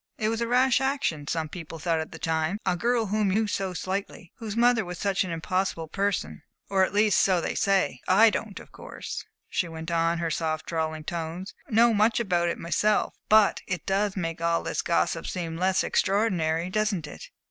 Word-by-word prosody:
"It 215 - 0
was 225 +1 -2
a 235 - 0
rash 250 +1 +3
action, 265 - -1
some 160 0 -1
people 165 -1 -8
thought 165 +1 0
at 160 - -5
the - - -8
time. 160 +3 -1
A 180 - +2
girl 235 +4 +1
whom 210 0 +1
you 205 +4 +2
knew 220 - -1
so 190 -2 -2
slightly, 185 -2 -4
whose 220 -1 -6
mother 240 -1 +4
was 180 -1 -7
such 200 0 0
an 185 - -5
impossible 165 0 -2
person 200 +4 -2 0.3
or 190 -1 +4
at - - 0
least, 210 +1 +3
so 185 -2 +3
they - - -2
say. 190 -11 +1
I 215 +4 +6
don't 210 -2 -4
of - - -14
course," - - -7 0.2
she 180 - -1
went 160 0 -6
on, 165 0 +2
in - - -3
her 165 -1 -2
soft, 155 -1 -2
drawling 160 -1 -2
tones, 170 +4 -5 0.2
"know 230 0 +5
much 215 +2 +3
about 175 -6 +1
it - - -2
myself, 210 +5 +1 0.2
but 215 -1 +5
it 180 -4 -3
does 195 +1 0
make 165 -2 -3
all 170 0 +1
this - - -2
gossip 170 -1 0
seem 170 -3 -4
less 185 +2 +1
extraordinary 180 -5 +1
doesn't 210 -5 0
it?" 485 - -10
185 Hz, 205 wpm, -26 LUFS, 165-210 Hz, 0.3 s, I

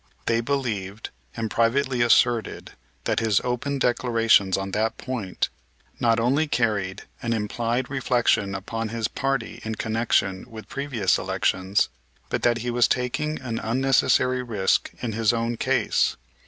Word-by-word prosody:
They 115 0 +2
believed 110 -6 -3 0.3
and 110 -1 -2
privately 125 +2 +1
asserted 120 -1 +2 0.3
that - - 0
his 110 -3 +2
open 125 +3 -2
declarations 115 -6 +3
on 95 0 -4
that 110 +3 0
point 115 -8 -3 0.5
not 115 -1 +3
only 135 +7 +2
carried 100 -8 -1 0.2
an 115 -1 -1
implied 115 +3 -1
reflection 120 -7 +1
upon 115 +3 -4
his 115 -1 -1
party 135 0 -2
in 110 0 -3
connection 110 -2 0
with 110 -2 -10
previous 135 -9 0
elections, 95 +2 0 0.4
but - - -1
that 120 -1 +3
he 120 - 0
was 120 -1 +4
taking 140 +5 -1
an 120 -3 -3
unnecessary 130 +1 +2
risk 105 -6 +1
in 120 - -1
his 115 0 +2
own 115 0 -1
case. - - +1
115 Hz, 140 wpm, -24 LUFS, 110-125 Hz, 0.5 s, was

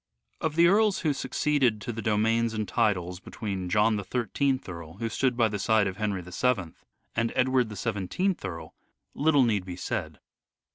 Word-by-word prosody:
Of 160 -1 -2
the 170 +1 +6
earls 205 +2 +4
who 155 -4 +1
succeeded 135 -5 +1
to 120 - -4
the 115 - -5
domains 110 +2 +1
and 110 -1 -2
titles 90 -3 0
between 95 -3 -5
John 105 +3 +3
the 100 - -3
I3th 130 +5 -1
Earl, 85 -3 -8
who 115 +3 -3
stood 125 +1 0
by 115 -2 +4
the 105 -1 -3
side 110 0 +3
of 95 -1 -3
Henry 105 -4 -2
VII, 90 -1 -1 0.4
and 115 0 +1
Edward 130 -2 +2
the 105 - -7
iyth 110 - -1
Earl, 80 -4 -6 0.4
little 145 -2 +3
need 105 -5 +1
be 90 -1 -7
said. 90 - -4
110 Hz, 180 wpm, -27 LUFS, 95-130 Hz, 0.4 s, the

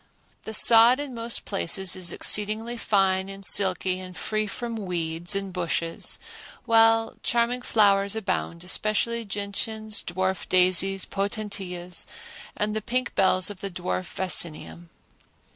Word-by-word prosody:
The 220 - -6
sod 235 +4 +7
in 290 -3 -5
most 230 0 -2
places 190 -1 0
is 180 -2 -1
exceedingly 215 +5 0
fine 195 -4 +1
and 195 0 -8
silky 185 -1 +3
and 185 -1 -9
free 215 0 -2
from 235 +3 -5
weeds 170 +1 0
and 195 -1 -3
bushes; 170 -2 -1 0.5
while 225 0 +3
charming 240 +1 0
flowers 200 -3 +2
abound, 185 -5 -3
especially 215 +5 -1
gentians, 210 +1 -3
dwarf 190 +1 -3
daisies, 185 +1 +3
potentillas, 195 -3 -4 0.5
and 210 +1 -1
the 215 - -2
pink 255 +4 -2
bells 185 0 +3
of 200 - -10
dwarf 185 -1 -4
vaccinium. 150 - -1
195 Hz, 125 wpm, -25 LUFS, 185-220 Hz, 0.5 s, sod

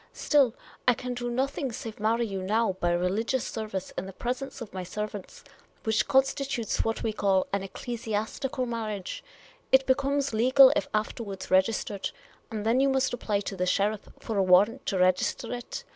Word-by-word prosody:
Still, 275 -6 +3 0.3
I 245 - +6
can 250 +1 -4
do 240 0 -3
nothing 265 +2 -1
save 225 -1 -7
marry 225 +3 +2
you 195 -3 -4
now 215 +2 +1
by 175 - +1
religious 200 +8 0
service 210 -4 -5
in 185 - -4
the 195 - -8
presence 255 +7 -4
of 235 -4 -8
my 190 - -4
servants 205 +2 -6 0.2
— - - -34
which 220 -1 +1
constitutes 270 -3 +1
what 225 0 -2
we 220 - 0
call 195 -2 +2
an 200 - +1
ecclesiastical 230 +5 -3
marriage 215 -5 -4 0.2
— - - -29
it 265 0 +6
becomes 275 0 +1
legal 260 +4 +7
if 195 - 0
afterwards 210 -3 -3
registered; 195 +1 +1 0.4
and 215 -2 -4
then 230 +3 +3
you 275 +1 +4
must 265 -1 +1
apply 210 -4 -1
to 195 - -5
the 180 -1 -1
sheriff 205 +3 0
for 220 -3 -3
a - - +4
warrant 195 +7 +4
to 195 - 0
register 185 +5 +1
it. 245 0 -6
220 Hz, 180 wpm, -28 LUFS, 195-250 Hz, 0.4 s, legal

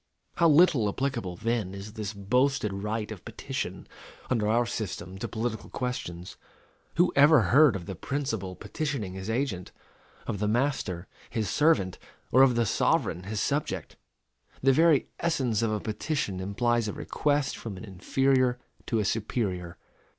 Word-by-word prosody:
How 170 -1 +5
little 150 - +5
applicable, 115 -6 -2
then, 110 -2 -2
is 100 +2 -8
this 105 -2 -4
boasted 115 +2 +1
right 105 +2 -3
of 105 -5 -8
petition, - - -5 0.4
under 110 -4 +2
our 120 +3 +3
system, 95 -4 -5
to - - -3
political 110 -1 -3
questions? 90 -9 -5 0.6
Who 175 +2 +3
ever 145 0 +7
heard 145 -4 +7
of 90 -3 -5
the 95 - -5
principal 110 - -3
petitioning 110 -2 -3
his 95 +2 -6
agent 110 -7 -2 0.5
of 100 - -3
the 105 - 0
master, 110 -7 0 0.2
his 110 -3 -2
servant 145 - +2 0.3
or 130 - +6
of 130 -3 +6
the 120 0 +2
sovereign, 90 -3 +1
his 105 +1 -3
subject? 145 +1 -2 0.7
_The 135 0 +5
very 160 0 +4
essence 130 -10 +1
of 115 -2 +1
a 105 - 0
petition 110 -2 -2
implies 115 +4 0
a 105 - -3
request 145 -2 0
from 105 -5 -7
an 105 - -8
inferior 130 +6 +1 0.3
to 115 - 0
a 105 - +1
superior. 95 -5 -2
115 Hz, 150 wpm, -28 LUFS, 100-135 Hz, 0.7 s, ever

